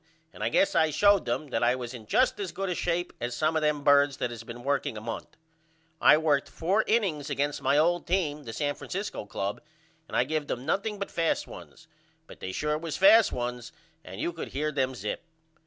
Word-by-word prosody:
and -, -, -7 dB
I -, -, +1 dB
guess 295 Hz, +1 st, +3 dB
I 160 Hz, -, +3 dB
showed 200 Hz, +5 st, +4 dB
them 150 Hz, -, -2 dB
that 115 Hz, -, 0 dB
I 120 Hz, +1 st, +3 dB
was 125 Hz, -1 st, -6 dB
in 110 Hz, -4 st, -10 dB
just -, -, +2 dB
as 195 Hz, -3 st, -3 dB
good 195 Hz, +2 st, -3 dB
a -, -, 0 dB
shape 175 Hz, 0 st, -1 dB
as 120 Hz, 0 st, -3 dB
some 155 Hz, +4 st, +1 dB
of 160 Hz, -, +2 dB
them 150 Hz, -1 st, 0 dB
birds 140 Hz, -1 st, +4 dB
that 120 Hz, -, -2 dB
has 115 Hz, -1 st, -8 dB
been 120 Hz, +1 st, -9 dB
working 140 Hz, -4 st, -1 dB
a -, -, -4 dB
month. 115 Hz, +1 st, -7 dB, 0.6 s
I -, -, +7 dB
worked 150 Hz, -3 st, +1 dB
4 195 Hz, +6 st, +1 dB
innings 185 Hz, -11 st, +1 dB
against 145 Hz, +1 st, -1 dB
my 145 Hz, -, +2 dB
old 175 Hz, +3 st, +2 dB
team 160 Hz, -5 st, 0 dB
the 115 Hz, -, -6 dB
San 145 Hz, +4 st, -1 dB
Francisco 195 Hz, -, -5 dB
Club 100 Hz, 0 st, -3 dB, 0.5 s
and -, -, -3 dB
I -, -, +4 dB
give 150 Hz, +2 st, -2 dB
them 125 Hz, +2 st, -4 dB
nothing 205 Hz, +6 st, -1 dB
but 200 Hz, -, -5 dB
fast 165 Hz, -1 st, 0 dB
ones -, -, -12 dB, 0.4 s
but -, -, -14 dB
they 95 Hz, -, -5 dB
sure 150 Hz, +8 st, -1 dB
was 165 Hz, -2 st, -4 dB
fast 210 Hz, +3 st, +7 dB
ones 125 Hz, -1 st, -4 dB, 0.3 s
and 95 Hz, +2 st, -9 dB
you 170 Hz, -, -1 dB
could 165 Hz, -, -6 dB
hear 150 Hz, +2 st, -2 dB
them 130 Hz, -2 st, -1 dB
zip. 105 Hz, -3 st, -4 dB
150 Hz, 220 wpm, -28 LUFS, 125-175 Hz, 0.6 s, I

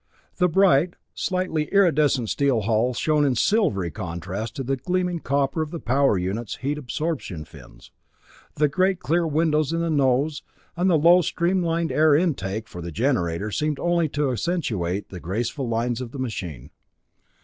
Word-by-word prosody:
The 180 Hz, -1 st, +3 dB
bright, 175 Hz, -2 st, +3 dB, 0.2 s
slightly 185 Hz, -5 st, -1 dB
iridescent 150 Hz, -, +3 dB
steel 135 Hz, -5 st, +1 dB
hull 115 Hz, +4 st, +1 dB
shone 150 Hz, +3 st, +2 dB
in 135 Hz, -3 st, +2 dB
silvery 110 Hz, -, +1 dB
contrast 95 Hz, +3 st, -5 dB
to 135 Hz, -, -3 dB
the 135 Hz, +2 st, 0 dB
gleaming 180 Hz, +5 st, -1 dB
copper 140 Hz, +1 st, 0 dB
of 155 Hz, -, -3 dB
the 170 Hz, -, -6 dB
power 135 Hz, -4 st, +2 dB
units' 100 Hz, +5 st, -3 dB
heat 145 Hz, +3 st, -3 dB
absorption 135 Hz, -, -4 dB
fins. 70 Hz, -7 st, -15 dB, 0.6 s
The 150 Hz, -, +3 dB
great 185 Hz, +4 st, +1 dB
clear 170 Hz, 0 st, +1 dB
windows 155 Hz, -1 st, +1 dB
in 165 Hz, -, -1 dB
the 165 Hz, -1 st, -1 dB
nose 140 Hz, +1 st, +1 dB, 0.3 s
and 180 Hz, +2 st, +1 dB
the 170 Hz, -, +4 dB
low, 170 Hz, +4 st, +6 dB
streamlined 170 Hz, -1 st, 0 dB
air 155 Hz, -1 st, +4 dB
intake 115 Hz, -, -1 dB
for 90 Hz, -, -9 dB
the 85 Hz, 0 st, -6 dB
generator 105 Hz, -, 0 dB
seemed 150 Hz, +4 st, -1 dB
only 170 Hz, -2 st, +1 dB
to 145 Hz, -1 st, 0 dB
accentuate 110 Hz, -, -2 dB
the 90 Hz, -, -8 dB
graceful 115 Hz, -, -3 dB
lines 115 Hz, +1 st, -1 dB
of 125 Hz, -2 st, -7 dB
the -, -, -6 dB
machine. 90 Hz, -, -5 dB
140 Hz, 160 wpm, -24 LUFS, 110-165 Hz, 0.6 s, low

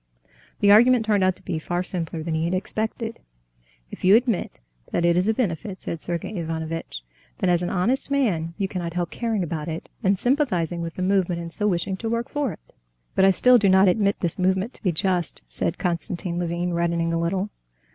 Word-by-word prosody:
The 200 Hz, -, +6 dB
argument 235 Hz, +2 st, +6 dB
turned 205 Hz, -3 st, +2 dB
out 185 Hz, -1 st, +2 dB
to -, -, -11 dB
be 165 Hz, -3 st, -2 dB
far 175 Hz, +3 st, -2 dB
simpler 170 Hz, -3 st, -1 dB
than 165 Hz, 0 st, -3 dB
he 160 Hz, +1 st, 0 dB
had 175 Hz, +2 st, 0 dB
expected. 220 Hz, +4 st, -3 dB, 0.7 s
"If -, -, -10 dB
you 190 Hz, +3 st, +7 dB
admit 235 Hz, -4 st, 0 dB, 0.3 s
that 170 Hz, -, +1 dB
it 170 Hz, 0 st, +4 dB
is 180 Hz, +3 st, +2 dB
a 220 Hz, -, +3 dB
benefit," 195 Hz, -3 st, -3 dB
said 165 Hz, -, -4 dB
Sergey 175 Hz, +4 st, -4 dB
Ivanovitch, 160 Hz, -, -4 dB, 0.4 s
"then, 180 Hz, -, +1 dB
as 175 Hz, -1 st, +2 dB
an 175 Hz, -, -1 dB
honest 230 Hz, +11 st, 0 dB
man, 185 Hz, -13 st, 0 dB
you 200 Hz, -2 st, 0 dB
cannot 175 Hz, -3 st, -4 dB
help 175 Hz, -1 st, -2 dB
caring 225 Hz, -5 st, -1 dB
about 160 Hz, -3 st, -4 dB
it 160 Hz, 0 st, -5 dB
and 195 Hz, -3 st, +2 dB
sympathizing 185 Hz, -, 0 dB
with 165 Hz, -1 st, -5 dB
the 185 Hz, -, -3 dB
movement, 185 Hz, -2 st, +1 dB
and 170 Hz, -1 st, -7 dB
so 210 Hz, -, 0 dB
wishing 190 Hz, 0 st, -1 dB
to 225 Hz, +3 st, -4 dB
work 235 Hz, +3 st, -2 dB
for 290 Hz, -3 st, -1 dB
it." -, -, -14 dB, 0.4 s
"But 190 Hz, -, +4 dB
I -, -, +7 dB
still 250 Hz, +6 st, +6 dB
do 200 Hz, -2 st, +3 dB
not 190 Hz, +1 st, +6 dB
admit 200 Hz, +2 st, +2 dB
this 175 Hz, -1 st, -1 dB
movement 190 Hz, +6 st, +1 dB
to -, -, -13 dB
be 185 Hz, -, +1 dB
just," 175 Hz, -, -1 dB
said -, -, -2 dB
Konstantin 175 Hz, 0 st, -2 dB
Levin, 175 Hz, 0 st, -2 dB
reddening 170 Hz, -1 st, 0 dB
a 165 Hz, -, 0 dB
little. 190 Hz, +4 st, -1 dB
180 Hz, 210 wpm, -24 LUFS, 170-210 Hz, 0.7 s, you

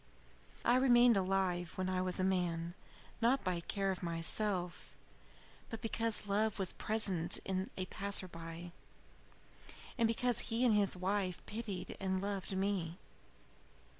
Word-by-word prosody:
"I 240 Hz, -, +5 dB
remained 245 Hz, -2 st, +6 dB
alive 185 Hz, -2 st, 0 dB
when 185 Hz, 0 st, -2 dB
I 185 Hz, 0 st, 0 dB
was 185 Hz, 0 st, +1 dB
a -, -, +1 dB
man, 175 Hz, -3 st, 0 dB, 0.5 s
not 245 Hz, +2 st, +3 dB
by 180 Hz, -2 st, 0 dB
care 195 Hz, +3 st, -1 dB
of 185 Hz, -, -4 dB
myself, 175 Hz, +2 st, -1 dB, 0.7 s
but 225 Hz, -, -5 dB
because 225 Hz, -2 st, -1 dB
love 210 Hz, +1 st, +1 dB
was 190 Hz, -3 st, 0 dB
present 195 Hz, -6 st, +3 dB
in 190 Hz, 0 st, -2 dB
a 185 Hz, -, -1 dB
passer 200 Hz, 0 st, -2 dB
by, 165 Hz, 0 st, -8 dB, 1.3 s
and 230 Hz, -, +5 dB
because 240 Hz, +1 st, +1 dB
he 235 Hz, +2 st, +2 dB
and 235 Hz, -, +5 dB
his 200 Hz, -3 st, +2 dB
wife 185 Hz, -1 st, -1 dB
pitied 205 Hz, -5 st, -5 dB
and 190 Hz, -1 st, 0 dB
loved 195 Hz, -1 st, -3 dB
me. 190 Hz, -4 st, -1 dB
190 Hz, 135 wpm, -35 LUFS, 180-215 Hz, 1.3 s, remained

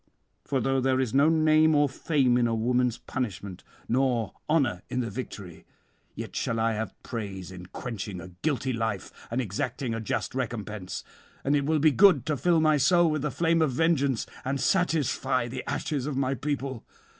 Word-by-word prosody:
For 135 Hz, -, -1 dB
though 135 Hz, +2 st, +1 dB
there 130 Hz, 0 st, +2 dB
is 130 Hz, -3 st, -1 dB
no 140 Hz, +3 st, +5 dB
name 155 Hz, -1 st, +4 dB
or 145 Hz, 0 st, +4 dB
fame 135 Hz, -2 st, +1 dB
in 120 Hz, -1 st, +3 dB
a 115 Hz, -, 0 dB
woman's 125 Hz, +1 st, +1 dB
punishment, 100 Hz, -7 st, -5 dB, 0.2 s
nor 125 Hz, -3 st, +1 dB, 0.2 s
honour 135 Hz, -, +2 dB
in 125 Hz, -, -1 dB
the 115 Hz, -3 st, -4 dB
victory, 95 Hz, -7 st, -7 dB, 0.5 s
yet -, -, -7 dB
shall 115 Hz, -1 st, -1 dB
I 115 Hz, 0 st, +2 dB
have 110 Hz, +1 st, -4 dB
praise 100 Hz, -6 st, -5 dB
in 90 Hz, -1 st, -9 dB
quenching 100 Hz, -4 st, -6 dB
a 85 Hz, +1 st, -9 dB
guilty 135 Hz, -4 st, 0 dB
life 110 Hz, -4 st, -2 dB, 0.2 s
and 120 Hz, -, -1 dB
exacting 120 Hz, +2 st, -2 dB
a 115 Hz, -, -3 dB
just 110 Hz, -, -2 dB
recompense; 110 Hz, -7 st, -4 dB, 0.4 s
and 140 Hz, +2 st, +2 dB
it 140 Hz, -1 st, +1 dB
will 160 Hz, 0 st, +3 dB
be 155 Hz, +1 st, +5 dB
good 170 Hz, -6 st, +5 dB
to 155 Hz, -1 st, 0 dB
fill 170 Hz, +4 st, +3 dB
my 155 Hz, -1 st, +4 dB
soul 170 Hz, +3 st, +4 dB
with 155 Hz, -2 st, -1 dB
the 150 Hz, -, -1 dB
flame 165 Hz, +3 st, +1 dB
of 150 Hz, -5 st, +2 dB
vengeance, 140 Hz, -4 st, +2 dB, 0.2 s
and 135 Hz, +1 st, -1 dB
satisfy 140 Hz, -7 st, +1 dB
the 125 Hz, +1 st, -5 dB
ashes 140 Hz, -3 st, -2 dB
of 145 Hz, -3 st, -3 dB
my 135 Hz, 0 st, +1 dB
people. 135 Hz, -3 st, -3 dB
130 Hz, 185 wpm, -27 LUFS, 115-150 Hz, 0.5 s, no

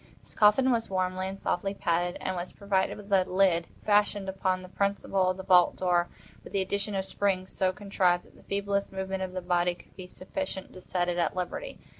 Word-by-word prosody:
This -, -, -14 dB
coffin 220 Hz, +5 st, +5 dB
was 230 Hz, -2 st, 0 dB
warmly 185 Hz, 0 st, -1 dB
and 195 Hz, +1 st, -6 dB
softly 195 Hz, +3 st, -1 dB
padded, 175 Hz, 0 st, 0 dB
and 185 Hz, -, -2 dB
was 175 Hz, +1 st, -4 dB
provided 195 Hz, -2 st, 0 dB
with 200 Hz, -1 st, -6 dB
a 190 Hz, -1 st, +6 dB
lid, 180 Hz, -3 st, +2 dB, 0.2 s
fashioned 205 Hz, -1 st, +2 dB
upon 185 Hz, -1 st, -1 dB
the -, -, -9 dB
principle 195 Hz, -1 st, 0 dB
of 185 Hz, -, -1 dB
the 190 Hz, -, -6 dB
vault 180 Hz, -2 st, +5 dB
door, 175 Hz, -1 st, +1 dB, 0.3 s
with -, -, -12 dB
the 195 Hz, -, +2 dB
addition 200 Hz, +2 st, -2 dB
of 190 Hz, 0 st, -1 dB
springs 190 Hz, -2 st, -1 dB
so 185 Hz, -1 st, +1 dB
contrived 185 Hz, -2 st, +1 dB
that -, -, -21 dB
the -, -, -18 dB
feeblest 200 Hz, 0 st, -1 dB
movement 190 Hz, 0 st, -3 dB
of 185 Hz, -1 st, -4 dB
the 185 Hz, -, -3 dB
body 175 Hz, 0 st, +1 dB
would -, -, -28 dB
be 185 Hz, -1 st, -9 dB
sufficient 190 Hz, +2 st, -5 dB
to 185 Hz, -, -11 dB
set 180 Hz, -1 st, -1 dB
it 175 Hz, 0 st, -1 dB
at 170 Hz, 0 st, 0 dB
liberty. 185 Hz, -, -4 dB
190 Hz, 215 wpm, -28 LUFS, 180-200 Hz, 0.3 s, a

